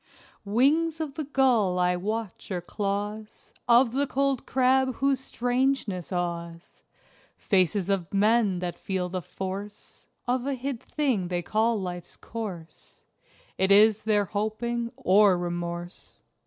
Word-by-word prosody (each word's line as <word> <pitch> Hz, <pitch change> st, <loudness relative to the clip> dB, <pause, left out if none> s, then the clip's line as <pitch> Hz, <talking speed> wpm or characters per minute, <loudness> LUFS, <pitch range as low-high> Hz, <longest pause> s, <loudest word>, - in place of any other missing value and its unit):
Wings 300 Hz, +10 st, +2 dB
of 310 Hz, -3 st, -3 dB
the 305 Hz, +1 st, -4 dB
gull 250 Hz, -9 st, +2 dB
I 180 Hz, 0 st, +2 dB
watch 215 Hz, +2 st, -4 dB
or 185 Hz, -3 st, -2 dB
claws 205 Hz, +3 st, -4 dB
Of 240 Hz, 0 st, +5 dB
the 280 Hz, +3 st, 0 dB
cold 275 Hz, -1 st, 0 dB
crab 260 Hz, 0 st, +2 dB
whose 275 Hz, 0 st, +1 dB
strangeness 245 Hz, -, -1 dB
awes: 170 Hz, -1 st, -4 dB, 0.6 s
Faces 185 Hz, 0 st, +1 dB
of 195 Hz, -3 st, -1 dB
men 210 Hz, -1 st, +3 dB
that 175 Hz, -1 st, -4 dB
feel 185 Hz, -2 st, -2 dB
the 185 Hz, 0 st, -3 dB
force 195 Hz, +4 st, -7 dB, 0.2 s
Of 250 Hz, +1 st, 0 dB
a 280 Hz, -, 0 dB
hid 260 Hz, -1 st, -4 dB
thing 255 Hz, -, -1 dB
they 175 Hz, -1 st, -2 dB
call 220 Hz, +4 st, +1 dB
life's 175 Hz, -2 st, -6 dB
course: 190 Hz, -8 st, -8 dB, 0.6 s
It 190 Hz, +1 st, +3 dB
is 215 Hz, +1 st, +6 dB
their 210 Hz, -2 st, +2 dB
hoping 230 Hz, +4 st, -2 dB
or 200 Hz, -6 st, +5 dB
remorse. 175 Hz, 0 st, -5 dB
210 Hz, 130 wpm, -27 LUFS, 185-250 Hz, 0.6 s, is